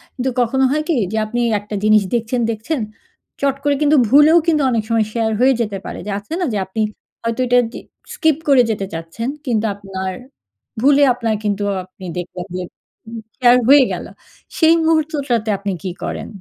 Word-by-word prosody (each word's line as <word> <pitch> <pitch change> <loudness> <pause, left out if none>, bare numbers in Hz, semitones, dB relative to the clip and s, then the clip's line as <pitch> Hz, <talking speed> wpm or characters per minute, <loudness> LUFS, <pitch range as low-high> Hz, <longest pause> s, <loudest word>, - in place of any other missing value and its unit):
কিন্তু 260 +1 -1
কখনো 265 +3 +1
হয় 305 +1 0
কি 335 - +3 0.2
যে 220 - -2
আপনি 235 +3 -3 0.2
একটা 210 +1 -7
জিনিস 215 -1 +5
দেখছেন, 235 +2 -1
দেখছেন, 230 +7 -3 0.6
চট 275 -1 +1
করে 285 0 +2
কিন্তু 300 +1 +4
ভুলেও 295 +5 +6
কিন্তু 310 -3 +3
অনেক 225 -2 0
সময় 225 -2 +2
শেয়ার 225 -1 0
হয়ে 265 +2 +5
যেতে 205 -3 -2
পারে। - - -6
যে 210 - -4
আছে 205 +10 -9
না 360 - 0
যে - - 0
আপনি 215 +4 -4 0.4
হয়তো 230 +1 -2
এটা 245 0 +4
দি - - -8 0.3
skip 315 -3 +2
করে 275 -3 +6
যেতে 200 -2 -3
চাচ্ছেন। 165 +9 -5 0.2
কিন্তু 225 -4 0
আপনার 190 -2 -5 0.7
ভুলে 285 +1 +5
আপনার 230 -3 -1
কিন্তু 205 -1 -1 0.2
আপনি 185 0 -13
দেখবেন 180 0 -6
যে 185 - -3 0.7
শেয়ার 245 -1 +5
হয়ে 280 -1 +8
গেল। - - -5 0.5
"সেই 325 0 +5
মুহূর্তটাতে 295 -8 0
আপনি 200 0 -3
কী 185 - -3
করেন?" - - -4
235 Hz, 180 wpm, -18 LUFS, 210-280 Hz, 0.7 s, হয়ে